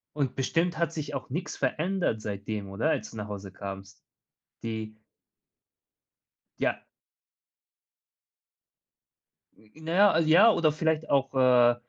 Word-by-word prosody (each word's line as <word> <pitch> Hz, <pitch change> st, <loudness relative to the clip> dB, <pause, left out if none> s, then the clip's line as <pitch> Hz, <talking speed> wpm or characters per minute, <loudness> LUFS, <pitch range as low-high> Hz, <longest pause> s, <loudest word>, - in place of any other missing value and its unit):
Und 135 Hz, -4 st, -1 dB
bestimmt 165 Hz, +5 st, 0 dB
hat 165 Hz, -1 st, 0 dB
sich 150 Hz, -3 st, -5 dB
auch 135 Hz, -, -6 dB
nix 175 Hz, +5 st, -4 dB
verändert 155 Hz, -, -1 dB
seitdem, 100 Hz, -1 st, -5 dB
oder, 115 Hz, +11 st, 0 dB
als -, -, -3 dB
du 110 Hz, -, -10 dB
nach 105 Hz, 0 st, -5 dB
Hause 100 Hz, -2 st, -7 dB
kamst? 95 Hz, 0 st, -9 dB, 0.6 s
Die 110 Hz, -1 st, -5 dB, 1.6 s
Ja. -, -, -1 dB, 2.7 s
Hm, 110 Hz, 0 st, -24 dB
na 165 Hz, -, -3 dB
ja, 205 Hz, +2 st, +6 dB
ah 160 Hz, -, +3 dB
ja, 170 Hz, +8 st, +6 dB
oder 155 Hz, -6 st, +2 dB
vielleicht 160 Hz, 0 st, -1 dB
auch, 135 Hz, -1 st, +1 dB
äh, 125 Hz, -2 st, +5 dB
135 Hz, 125 wpm, -28 LUFS, 110-160 Hz, 2.7 s, ja